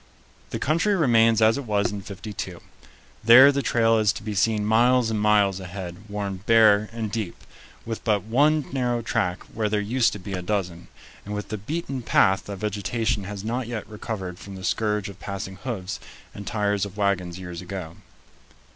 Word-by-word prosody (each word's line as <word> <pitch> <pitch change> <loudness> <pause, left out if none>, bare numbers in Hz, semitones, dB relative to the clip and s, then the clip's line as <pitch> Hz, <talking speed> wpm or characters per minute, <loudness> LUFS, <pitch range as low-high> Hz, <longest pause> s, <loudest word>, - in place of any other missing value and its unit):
The - - -3
country 165 - +1
remains 115 - +4
as 110 +5 +4
it 140 - -6
was 105 -2 +1
in 100 -1 -5
'52. 100 +1 -7 0.6
There 125 +5 +9
the 140 0 -1
trail 115 -3 +3
is 105 -1 +3
to - - -8
be 105 -1 -4
seen 105 +1 +1
miles 120 +2 +3
and 105 -1 -1
miles 105 -2 +3
ahead, 95 +2 -8
worn 100 -2 -3
bare 110 -2 +5
and 115 -2 -4
deep, 105 -5 -3 0.5
with 115 -1 -5
but 105 -3 +1
one 145 +7 +2
narrow 120 -3 0
track 90 -5 -1
where 110 -2 -1
there 105 0 +1
used 115 +4 +2
to 105 - -6
be 100 +2 -7
a 90 - -2
dozen, 90 -3 -3 0.4
and 105 +1 -5
with 105 - -5
the 110 - -3
beaten 140 - -4
path 95 -4 +3
that 100 - -5
vegetation 105 +1 -2
has 100 0 -6
not 120 +2 -2
yet 120 -2 -5
recovered 100 -4 -6
from 100 -1 -9
the 95 - -9
scourge 105 0 0
of 100 -1 -10
passing 95 -1 -6
hoofs 100 -5 -5 0.3
and 100 - -9
tires 105 -3 0
of 100 0 -5
wagons 95 -4 0
years 90 -2 -7
ago. 90 -3 -7
105 Hz, 185 wpm, -24 LUFS, 100-115 Hz, 0.6 s, There